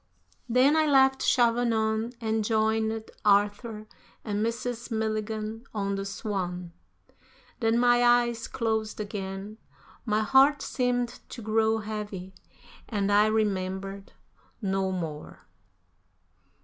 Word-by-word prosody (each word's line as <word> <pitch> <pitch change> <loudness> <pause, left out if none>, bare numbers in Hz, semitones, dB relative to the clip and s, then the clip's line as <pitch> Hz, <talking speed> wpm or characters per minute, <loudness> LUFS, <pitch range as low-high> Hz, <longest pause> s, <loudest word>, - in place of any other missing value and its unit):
Then 255 +5 +4
I 315 -1 +3
left 265 -2 +4
Chavanon, 230 -1 +2
and 220 -1 0
joined 220 0 0
Arthur 210 +2 +1 0.4
and 210 -1 -1
Mrs. 235 +1 -3
Milligan 220 0 -3
on 200 -1 -1
the 195 0 -3
Swan. 180 -4 -4 0.9
Then 225 -1 +2
my 240 0 +4
eyes 240 -1 +3
closed 220 -2 -2
again, 200 0 -5 0.4
my 215 -2 +1
heart 270 +5 +4
seemed 245 -1 -1
to 235 - -8
grow 220 +1 +2
heavy, 210 -3 -6 0.6
and 205 -2 0
I 205 +1 +5
remembered 195 -2 -2 0.5
no 195 -3 -1
more. 160 -5 -6
220 Hz, 105 wpm, -27 LUFS, 205-235 Hz, 0.9 s, I